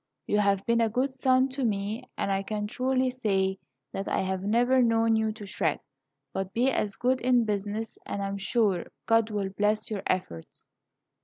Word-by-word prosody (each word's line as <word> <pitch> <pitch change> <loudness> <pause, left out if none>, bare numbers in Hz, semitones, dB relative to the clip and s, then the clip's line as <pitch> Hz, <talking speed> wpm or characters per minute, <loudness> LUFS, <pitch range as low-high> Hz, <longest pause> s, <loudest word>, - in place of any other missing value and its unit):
You 210 - +1
have 200 -1 +2
been 235 0 +3
a 225 - +3
good 260 +4 0
son 260 0 +3
to 265 +1 -4
me, 215 +3 -2
and 195 - -1
I 195 0 +1
can 210 +1 -3
truly 255 +3 0
say 195 -6 0 0.3
that 195 - -4
I - - +1
have 190 0 -2
never 240 +6 +3
known 225 -1 +3
you 220 0 +1
to 215 -1 -9
shirk. 160 -5 -1 0.7
Be 250 +3 +2
as 205 -5 -1
good 255 +1 +1
in 245 -2 +3
business, 210 +1 -3
and 200 - -4
I - - -1
am 200 0 -3
sure 200 -3 +1 0.2
God 225 -1 +3
will 205 -2 -2
bless 210 +2 0
your 205 -3 -2
efforts." 85 - -4
215 Hz, 185 wpm, -28 LUFS, 200-245 Hz, 0.7 s, been